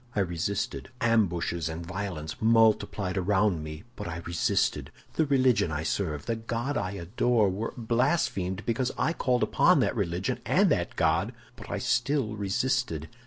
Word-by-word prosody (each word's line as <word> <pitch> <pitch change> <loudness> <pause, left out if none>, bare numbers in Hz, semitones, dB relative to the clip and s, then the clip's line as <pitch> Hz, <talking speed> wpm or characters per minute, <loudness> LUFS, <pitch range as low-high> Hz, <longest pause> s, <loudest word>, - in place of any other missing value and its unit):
I 105 - +2
resisted. 95 +8 -2
Ambushes 90 -7 +1
and 80 +1 -6
violences 90 -4 -5
multiplied 110 -4 +3
around 95 -3 +1
me, 75 0 -7
but 105 - -6
I 85 0 -5
resisted. 85 0 0 0.2
The 160 - +1
religion 130 - +3
I 75 +1 -2
serve, 80 -3 -2
the 115 - -1
God 115 +5 -3
I 100 0 -2
adore, 105 +4 +1
were 105 +5 -4
blasphemed 115 - 0
because 120 +2 0
I 165 - +1
called 125 -6 +1
upon - - +4
that - - 0
religion 85 +2 -1
and - - +3
that - - 0
God, - - +1 0.2
but - - -5
still 130 -2 +1
I - - -5
resisted. 100 - -1
100 Hz, 155 wpm, -28 LUFS, 85-120 Hz, 0.2 s, upon